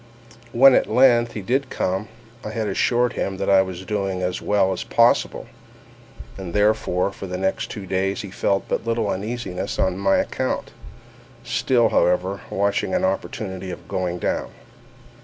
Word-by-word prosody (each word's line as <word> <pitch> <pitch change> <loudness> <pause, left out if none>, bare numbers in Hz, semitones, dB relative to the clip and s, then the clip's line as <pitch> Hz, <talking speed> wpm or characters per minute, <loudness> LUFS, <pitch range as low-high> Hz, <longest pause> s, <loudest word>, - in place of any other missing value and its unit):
When 130 +3 +7
at - - +2
length 120 -2 +4
he 105 - -5
did 130 +6 0
come, 95 +3 -2 0.4
I - - -5
had 110 0 -2
assured 120 +4 +1
him 95 -1 -3
that - - 0
I 95 -1 +7
was 95 -1 -5
doing 95 -2 -2
as 90 0 -2
well 100 -2 +2
as 90 - -4
possible; - - +2 0.9
and, 90 -3 -7
therefore, 105 -3 +2
for 95 - -8
the 90 - -4
two 90 - -4
next 95 0 -2
days 95 +1 -1
he 100 - -8
felt 100 0 0
but - - -1
little 115 -2 0
uneasiness 100 -2 -4
on 95 0 0
my 100 0 +3
account—still, 120 -3 -2
however, 90 +2 +1
watching 100 - 0
an 185 0 +1
opportunity 95 - -3
of 90 - -8
going 90 -2 -2
down. - - -2
100 Hz, 160 wpm, -22 LUFS, 95-115 Hz, 0.9 s, When